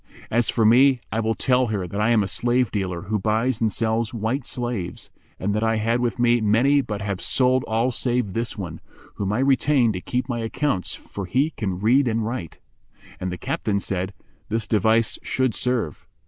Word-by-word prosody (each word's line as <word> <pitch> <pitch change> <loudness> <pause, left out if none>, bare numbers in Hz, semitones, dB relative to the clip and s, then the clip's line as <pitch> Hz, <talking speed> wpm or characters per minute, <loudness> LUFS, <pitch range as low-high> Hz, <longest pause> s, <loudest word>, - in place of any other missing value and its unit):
As 120 +1 +2
for 115 - +2
me 130 +4 +6
I 110 - -1
will 110 0 0
tell 125 -1 +2
her 105 -4 -2
that 100 +4 -3
I 110 - +2
am 115 -3 +4
a - - -2
slave 120 +3 +1
dealer[FN#393] 95 -3 -3
who 110 -1 +1
buys 110 +4 0
and 110 -2 +2
sells 110 +2 0
white 115 +4 -2
slaves, 120 -8 -3 0.3
and 100 +2 -1
that 105 - 0
I 115 0 +2
had 115 +2 +1
with 120 0 -1
me 120 -1 +3
many 120 +7 +4
but 105 -5 -5
have 100 -2 -3
sold 130 0 +2
all 115 +3 +1
save 120 -5 -1
this 115 0 -2
one, 85 -5 -6 0.4
whom 100 -1 -1
I 105 - 0
retained 135 -2 +3
to 90 - -4
keep 125 +4 -2
my 120 -3 -2
accounts, 115 -2 -1
for 100 -2 -8
he 135 - +1
can 95 - -3
read 125 +6 +3
and 115 -1 0
write." 110 -8 -5 0.6
And 90 0 -3
the 90 - -4
captain 100 +3 -1
said 95 0 -3 0.3
"This 110 -1 -1
device 110 +2 +2
should 130 -3 0
serve." 120 - -2
115 Hz, 200 wpm, -23 LUFS, 105-125 Hz, 0.6 s, me